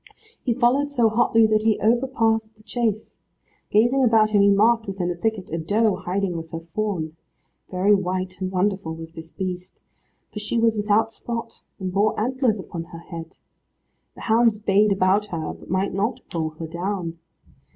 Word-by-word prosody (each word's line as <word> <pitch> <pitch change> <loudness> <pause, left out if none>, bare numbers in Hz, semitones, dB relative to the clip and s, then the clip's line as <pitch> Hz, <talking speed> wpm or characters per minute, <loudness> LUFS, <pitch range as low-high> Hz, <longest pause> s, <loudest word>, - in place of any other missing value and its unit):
He 240 -3 0
followed 265 +4 +2
so 240 -6 +3
hotly 225 0 +4
that 215 0 +2
he 220 -1 +2
over 240 +4 +2
passed 225 -3 0
the 215 - -21
chase. 220 -2 -2 0.5
Gazing 240 +6 +3
about 220 -3 +4
him 205 -2 +4
he 200 - +6
marked, 220 +3 +3
within 185 -2 -2
a - - -3
thicket, 205 0 -2
a 165 - -2
doe 205 +5 +2
hiding 185 0 -2
with 165 -1 -6
her 165 - -5
fawn. 165 -2 -3 0.5
Very 190 +3 +3
white 185 -1 -1
and 185 - -1
wonderful 190 -3 -1
was 165 0 -9
this 160 0 -10
beast, 180 -1 -6 0.5
for 210 - -4
she 210 +3 -2
was 225 -1 +3
without 210 +1 +2
spot, 230 0 -6 0.2
and 185 -1 -4
bore 205 +2 +2
antlers 245 -1 +1
upon 170 -2 -6
her 170 0 -11
head. 165 -1 -9 0.8
The - - -12
hounds 225 -1 +3
bayed 205 0 +3
about 195 +2 +2
her, 165 -5 -4
but - - -15
might 190 +3 0
not 205 +6 -1
pull 160 -2 -1
her 155 +1 -8
down. 170 0 -4
205 Hz, 180 wpm, -23 LUFS, 180-225 Hz, 0.8 s, he